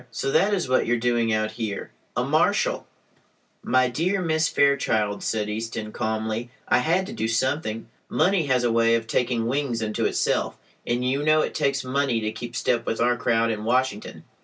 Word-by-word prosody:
"So 135 Hz, -, -3 dB
that 200 Hz, +8 st, +3 dB
is 190 Hz, -7 st, 0 dB
what 130 Hz, -2 st, +2 dB
you 120 Hz, -, +2 dB
are -, -, -1 dB
doing 120 Hz, -1 st, +1 dB
out 110 Hz, 0 st, 0 dB
here? 110 Hz, -2 st, -5 dB, 0.3 s
A -, -, +2 dB
marshal!" -, -, +1 dB, 0.7 s
"My 130 Hz, 0 st, +2 dB
dear 170 Hz, +11 st, 0 dB
Miss 160 Hz, -2 st, +1 dB
Fairchild," 110 Hz, -7 st, +1 dB
said 110 Hz, -2 st, -1 dB
Easton, 110 Hz, 0 st, -4 dB
calmly, 110 Hz, +1 st, -2 dB, 0.2 s
"I -, -, +4 dB
had 170 Hz, +8 st, +1 dB
to 215 Hz, -, -7 dB
do 165 Hz, -, -2 dB
something. 115 Hz, -1 st, -1 dB, 0.2 s
Money 175 Hz, -1 st, +2 dB
has 130 Hz, -2 st, +2 dB
a 120 Hz, -, +2 dB
way 115 Hz, 0 st, +3 dB
of 115 Hz, -1 st, -1 dB
taking 120 Hz, 0 st, 0 dB
wings 130 Hz, -1 st, -1 dB
unto 110 Hz, -1 st, -1 dB
itself, -, -, 0 dB, 0.3 s
and 120 Hz, +1 st, 0 dB
you 135 Hz, +2 st, 0 dB
know 155 Hz, +1 st, +4 dB
it -, -, -2 dB
takes 140 Hz, -1 st, 0 dB
money 130 Hz, -2 st, 0 dB
to 110 Hz, -1 st, -2 dB
keep 120 Hz, +1 st, -8 dB
step 120 Hz, 0 st, 0 dB
with 115 Hz, -, -1 dB
our 120 Hz, +1 st, +3 dB
crowd 115 Hz, -1 st, +1 dB
in 105 Hz, -1 st, -4 dB
Washington. 120 Hz, -2 st, -1 dB
120 Hz, 190 wpm, -24 LUFS, 115-140 Hz, 0.7 s, I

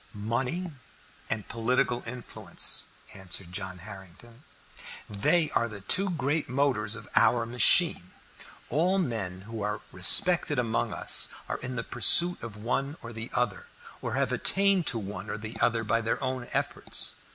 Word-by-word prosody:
"Money 125 Hz, -, -3 dB, 0.6 s
and 110 Hz, -2 st, -4 dB
political 120 Hz, +1 st, -1 dB
influence," 120 Hz, +1 st, -1 dB, 0.3 s
answered 95 Hz, -2 st, -2 dB
John 95 Hz, 0 st, -4 dB
Harrington. 100 Hz, -, -12 dB, 0.6 s
"They 150 Hz, -, +1 dB
are 115 Hz, -, 0 dB
the 105 Hz, -2 st, -10 dB
two 195 Hz, -, +2 dB
great 150 Hz, -3 st, -2 dB
motors 125 Hz, -5 st, 0 dB
of 115 Hz, -2 st, -11 dB
our 120 Hz, -1 st, +3 dB
machine. 120 Hz, -, +4 dB, 0.6 s
All 175 Hz, +8 st, +1 dB
men 110 Hz, -, -3 dB
who 110 Hz, +2 st, -8 dB
are 105 Hz, +1 st, -3 dB
respected 145 Hz, -, +4 dB
among 115 Hz, -2 st, -1 dB
us -, -, +4 dB, 0.2 s
are -, -, -4 dB
in 125 Hz, 0 st, -6 dB
pursuit 170 Hz, -, +6 dB
of 110 Hz, -3 st, -8 dB
one 135 Hz, +7 st, -3 dB
or 120 Hz, 0 st, -9 dB
the 110 Hz, +1 st, -7 dB
other, 125 Hz, -5 st, -2 dB, 0.3 s
or -, -, -4 dB
have -, -, -1 dB
attained 195 Hz, -3 st, +2 dB
to 120 Hz, -, +1 dB
one 105 Hz, 0 st, -7 dB
or 105 Hz, -, -4 dB
the 110 Hz, +2 st, -8 dB
other 115 Hz, -1 st, +1 dB
by 115 Hz, +1 st, 0 dB
their 115 Hz, 0 st, -2 dB
own 130 Hz, -2 st, -4 dB
efforts. -, -, -1 dB
115 Hz, 150 wpm, -27 LUFS, 105-135 Hz, 0.6 s, pursuit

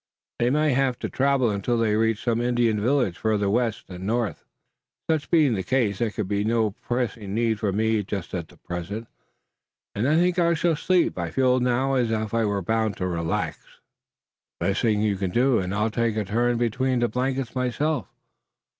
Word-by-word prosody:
They 120 Hz, -, +2 dB
may 150 Hz, +1 st, +2 dB
have 130 Hz, -1 st, +1 dB
to -, -, -4 dB
travel 135 Hz, -3 st, +2 dB
until 105 Hz, +4 st, -1 dB
they 110 Hz, -2 st, +2 dB
reach 110 Hz, -1 st, +1 dB
some 115 Hz, -1 st, +1 dB
Indian 120 Hz, -3 st, +1 dB
village 120 Hz, -7 st, +1 dB
farther 105 Hz, -2 st, +1 dB
west 115 Hz, -1 st, 0 dB
and 90 Hz, 0 st, -8 dB
north." 115 Hz, -1 st, -1 dB, 0.6 s
"Such 160 Hz, -3 st, 0 dB
being 155 Hz, -7 st, +4 dB
the 95 Hz, -, -1 dB
case, 110 Hz, -1 st, 0 dB
there 120 Hz, -2 st, +1 dB
can 105 Hz, -1 st, -3 dB
be 100 Hz, +1 st, -1 dB
no 110 Hz, -1 st, +1 dB
pressing 115 Hz, -2 st, -3 dB
need 115 Hz, -2 st, +1 dB
for 105 Hz, -2 st, 0 dB
me 110 Hz, +2 st, +1 dB
just 100 Hz, -2 st, -5 dB
at 85 Hz, -3 st, -4 dB
present, 100 Hz, +6 st, -5 dB, 0.9 s
and 110 Hz, +5 st, 0 dB
I 155 Hz, -, +3 dB
think 180 Hz, +2 st, +2 dB
I 170 Hz, -1 st, +3 dB
shall 165 Hz, +1 st, +1 dB
sleep. 175 Hz, -, +1 dB
I 85 Hz, -1 st, -2 dB
feel 130 Hz, +5 st, +2 dB
now 125 Hz, +2 st, +1 dB
as 125 Hz, -3 st, +1 dB
if 110 Hz, -1 st, -2 dB
I 115 Hz, -1 st, +2 dB
were 100 Hz, -2 st, -1 dB
bound 110 Hz, 0 st, 0 dB
to 90 Hz, -, -2 dB
relax." 85 Hz, -2 st, -2 dB, 1.0 s
"The -, -, 0 dB
best 100 Hz, -, 0 dB
thing 105 Hz, -2 st, +2 dB
you 105 Hz, -2 st, +1 dB
could 95 Hz, -2 st, -3 dB
do, 125 Hz, 0 st, +3 dB
and 90 Hz, -1 st, -3 dB
I'll 105 Hz, +2 st, 0 dB
take 115 Hz, -1 st, 0 dB
a 105 Hz, -, 0 dB
turn 120 Hz, +4 st, +1 dB
between 125 Hz, +2 st, 0 dB
the 120 Hz, -, +3 dB
blankets 130 Hz, +2 st, -2 dB
myself." 130 Hz, -, -1 dB
115 Hz, 195 wpm, -25 LUFS, 105-125 Hz, 1.0 s, being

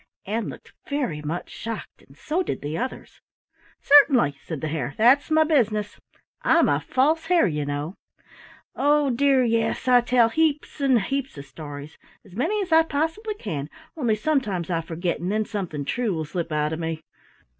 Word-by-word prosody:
Ann 220 Hz, +3 st, -2 dB
looked -, -, -12 dB, 0.2 s
very 255 Hz, -, -2 dB
much 155 Hz, +4 st, -5 dB
shocked, 230 Hz, -1 st, -7 dB
and 135 Hz, -, -21 dB
so 325 Hz, +5 st, -1 dB
did 365 Hz, -, -4 dB
the 150 Hz, +2 st, -3 dB
others. 255 Hz, +8 st, -6 dB, 0.6 s
"Certainly," 275 Hz, -, +6 dB
said 160 Hz, -4 st, -5 dB
the 155 Hz, -, -3 dB
Hare, 145 Hz, -3 st, -3 dB
"that's 250 Hz, +7 st, +4 dB
my 315 Hz, 0 st, +5 dB
business, 215 Hz, -9 st, 0 dB, 0.4 s
I'm -, -, +4 dB
a -, -, +2 dB
False 315 Hz, +5 st, +1 dB
Hare, 355 Hz, -1 st, +4 dB
you 150 Hz, -4 st, -2 dB
know. 145 Hz, +4 st, -3 dB, 0.8 s
Oh, 290 Hz, -1 st, +3 dB
dear, 270 Hz, +1 st, +3 dB
yes, 230 Hz, +2 st, 0 dB
I 250 Hz, -1 st, +6 dB
tell 240 Hz, -1 st, +3 dB
heaps 300 Hz, +1 st, 0 dB
and 265 Hz, -4 st, +4 dB
heaps 270 Hz, -, -3 dB
of 140 Hz, -, -8 dB
stories, 145 Hz, +1 st, -9 dB, 0.3 s
as 190 Hz, -2 st, -15 dB
many 335 Hz, -, 0 dB
as 360 Hz, -, -9 dB
I 320 Hz, 0 st, +7 dB
possibly 325 Hz, +8 st, -2 dB
can, 155 Hz, -, -5 dB, 0.3 s
only 240 Hz, -9 st, +1 dB
sometimes 215 Hz, -, -1 dB
I 165 Hz, -1 st, 0 dB
forget 170 Hz, +1 st, -3 dB
and 180 Hz, +3 st, -2 dB
then 215 Hz, +1 st, 0 dB
something 170 Hz, -10 st, -4 dB
true 225 Hz, -, -1 dB
will 160 Hz, -1 st, -3 dB
slip 165 Hz, +2 st, -4 dB
out 150 Hz, 0 st, 0 dB
of 160 Hz, -, -4 dB
me. 160 Hz, -1 st, -4 dB
225 Hz, 175 wpm, -24 LUFS, -, 0.8 s, I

